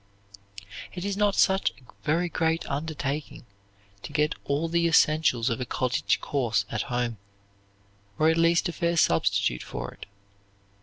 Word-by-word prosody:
It 180 +1 -5
is 200 -1 -1
not 205 -1 +2
such 190 0 +3
a - - -20 0.3
very 165 +4 +1
great 165 -1 0
undertaking 145 -2 -4 0.6
to 150 - -8
get 150 +1 +1
all 145 +4 0
the 170 0 +2
essentials 155 -7 +3
of 115 - -2
a - - +1
college 125 -1 0
course 115 -7 0
at 110 - -1
home, 120 -3 -2 1.0
or 155 - +3
at 160 - +4
least 165 +2 +3
a - - -2
fair 170 -1 0
substitute 80 - +2
for - - -6
it. - - -12
155 Hz, 150 wpm, -26 LUFS, 125-170 Hz, 1.0 s, at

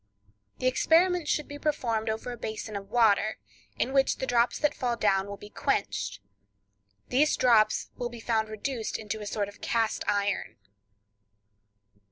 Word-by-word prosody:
The - - -5
experiment 335 +5 +3
should 300 - 0
be 290 0 -8
performed 235 -8 -1
over 220 +3 -3
a - - -5
basin 220 -1 -5
of 195 -1 -6
water, 220 -2 +3 0.4
in 265 - -1
which 270 -1 +3
the 265 - -2
drops 240 -1 +2
that 295 - +1
fall 240 -2 -1
down 195 -2 +2
will 200 0 -6
be 205 +1 -12
quenched. 100 0 -1 0.9
These 295 +4 +3
drops 230 -4 +3
will 245 - -3
be 240 -1 -9
found 220 -1 0
reduced 220 +1 -3
into 215 0 -5
a 210 - -6
sort 205 -1 -1
of 205 - -13
cast 225 -1 0
iron. 205 0 0
225 Hz, 160 wpm, -28 LUFS, 210-255 Hz, 0.9 s, experiment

